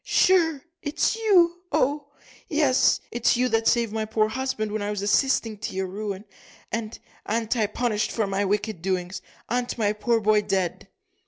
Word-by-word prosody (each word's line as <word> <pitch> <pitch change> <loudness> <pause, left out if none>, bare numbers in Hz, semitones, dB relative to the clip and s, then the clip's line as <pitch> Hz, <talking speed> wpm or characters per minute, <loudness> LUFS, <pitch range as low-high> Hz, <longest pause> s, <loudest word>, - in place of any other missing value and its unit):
"Sure, 325 -6 +3 0.2
it's 300 +7 0
you 360 -6 +3
oh! 285 +2 +1 0.4
yes 290 -4 +3
it's 240 0 +2
you 250 +1 +2
that 225 -1 +1
saved 235 -3 +2
my 220 0 -1
poor 215 0 +1
husband 240 -3 -2
when 215 0 -2
I 205 - -2
was 205 -1 -3
assisting 225 -1 +1
to 210 - -5
your 190 0 -1
ruin. 200 +1 -5 0.5
And 225 -1 -4 0.3
a'n't 225 +2 0
I 220 -3 +1
punished 215 0 -1
for 220 - 0
my 195 0 -1
wicked 205 -2 -1
doings 185 0 -2 0.3
a'n't 245 0 -2
my 210 -2 +1
poor 230 +2 +1
boy 215 0 +3
dead?" 190 -4 -2
220 Hz, 170 wpm, -25 LUFS, 205-255 Hz, 0.5 s, Sure